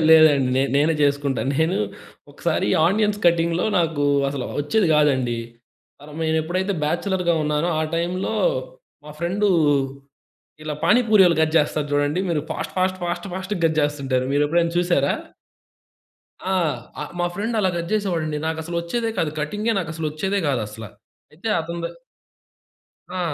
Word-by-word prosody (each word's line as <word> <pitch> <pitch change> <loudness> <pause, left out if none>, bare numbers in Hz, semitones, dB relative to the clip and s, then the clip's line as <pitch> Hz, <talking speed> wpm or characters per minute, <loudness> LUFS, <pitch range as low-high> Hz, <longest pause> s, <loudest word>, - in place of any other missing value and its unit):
లేదండి. 155 -5 +6
నే 135 - +3
నేనే 155 +3 +3
చేసుకుంటా. 140 -1 +1 0.2
నేను 160 +4 +2 0.5
ఒకసారి - - -1 0.2
ఆనియన్స్ 210 +2 +1
కటింగ్‌‌లో 170 0 +2
నాకు 165 -4 0 0.3
అసల 135 -2 -4 0.2
ఒచ్చేది 185 +8 +1
కాదండి. 130 -6 +2 0.6
మరినేనెప్పుడైతే 160 +5 -1
బ్యాచలర్‌గా 175 +2 0
ఉన్నానో 150 +2 0
ఆ - - +1
టైంలో 175 +3 -1 0.7
మా 150 - -10
ఫ్రెండు 190 +5 0 1.1
ఇలా 155 -1 -4
పానీపూరీయోళ్ళు 210 -6 +5
కట్ 160 0 0
చేస్తారు 150 0 0
చూడండి 145 +4 +1
మీరు. 160 -3 +1
ఫాస్ట్, - - -4
ఫాస్ట్, 185 0 +1
ఫాస్ట్, 175 +3 -3
ఫాస్ట్‌గా 190 0 -4
కట్ 160 -1 -1
చేస్తుంటారు 135 -3 -1
మీరెప్పుడైనా 165 +4 +2
చూసారా? 175 -6 +2 1.3
ఆ! - - +1 0.5
ఆ - - -2 0.2
మా 175 - +2
ఫ్రెండ్ 225 +5 -2
అలా 190 -2 +2
కట్ 170 0 -3
చేసేవాడండి. 170 -8 -1
నాకసలొచ్చేదే 170 +7 -2
కాదు 155 - +1
కటింగే 210 +9 -1
నాకసలొచ్చేదే 160 +3 -2
కాదసల. 110 -4 -3 0.5
అయితే 175 +9 -6
అతని 170 +1 -5
ద - - +1 1.3
ఆ! - - -1
165 Hz, 125 wpm, -22 LUFS, 150-185 Hz, 1.3 s, లేదండి